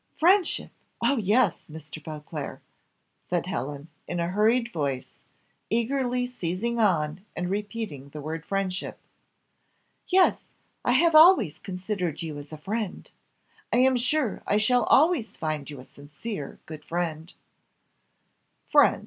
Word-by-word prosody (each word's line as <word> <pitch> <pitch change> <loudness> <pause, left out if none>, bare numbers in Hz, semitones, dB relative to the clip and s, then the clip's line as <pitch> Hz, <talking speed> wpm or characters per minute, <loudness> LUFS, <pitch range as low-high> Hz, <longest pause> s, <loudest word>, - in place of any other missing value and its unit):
"Friendship! 360 +2 +3 0.3
Oh, 280 - +3
yes! 225 +4 +2
Mr. 155 -1 -9
Beauclerc," 150 -1 -7 0.6
said - - 0
Helen, 140 +4 -4 0.2
in 175 - -3
a 170 0 0
hurried 230 +5 +2
voice, 140 -5 -2 0.6
eagerly 250 +2 0
seizing 235 0 -2
on 170 -4 +1
and 180 +1 -2
repeating 205 - -4
the 150 - -8
word 160 +2 -5
friendship; 195 0 -2 1.1
"yes, 370 0 +4 0.4
I - - +2
have 335 -1 +4
always 315 - +7
considered 185 -4 -3
you 155 -3 -5
as 145 +1 -11
a 155 - -7
friend. 205 +5 -4 0.6
I - - +3
am 260 +1 +5
sure 250 0 0
I 205 - +3
shall 240 +2 +3
always 300 -6 +3
find 155 -3 -3
you 145 -3 -8
a 130 - -11
sincere, 145 +4 -7
good 155 -1 -9
friend." 165 -1 -3 1.4
"Friend!" - - +6
190 Hz, 130 wpm, -26 LUFS, 155-240 Hz, 1.4 s, always